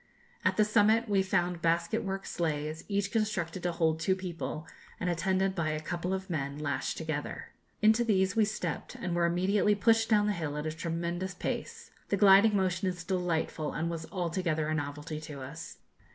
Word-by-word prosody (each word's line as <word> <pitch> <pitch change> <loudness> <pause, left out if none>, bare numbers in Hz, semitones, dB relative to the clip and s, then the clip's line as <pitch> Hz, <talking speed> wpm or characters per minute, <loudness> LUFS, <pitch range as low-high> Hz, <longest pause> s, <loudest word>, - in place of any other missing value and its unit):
At - - +2
the 215 - +5
summit 220 +2 +4
we 200 -2 +3
found 180 -2 0
basket 170 +5 +1
work 195 0 -3
sleighs, 155 -2 -2
each 200 0 0
constructed 195 -6 -1
to 175 - 0
hold 160 -2 +1
two 185 +4 +2
people, 175 -4 -5 0.3
and 180 - 0
attended 190 +3 +1
by 165 -4 -1
a 155 0 -1
couple 175 +3 -3
of 190 0 -2
men, 140 -4 -3
lashed 140 -3 -2
together. 155 -2 -4 0.3
Into 220 +2 +5
these 195 -4 +2
we 220 - +5
stepped, 185 -6 -4
and 180 -2 -3
were 170 0 +3
immediately 195 +4 +2
pushed 225 +2 +3
down 210 -2 +4
the 210 - +1
hill 155 -5 -3
at 150 - -3
a 155 - -1
tremendous 170 +3 -3
pace. - - -4 0.2
The 200 - +2
gliding 200 +2 +7
motion 190 0 0
is 180 -2 -3
delightful, 175 -4 -1
and 165 +2 -1
was 165 -1 -5
altogether 170 -4 -1
a - - +1
novelty 150 +1 -4
to 150 -2 -8
us. 150 +5 -8
175 Hz, 185 wpm, -30 LUFS, 160-195 Hz, 0.3 s, gliding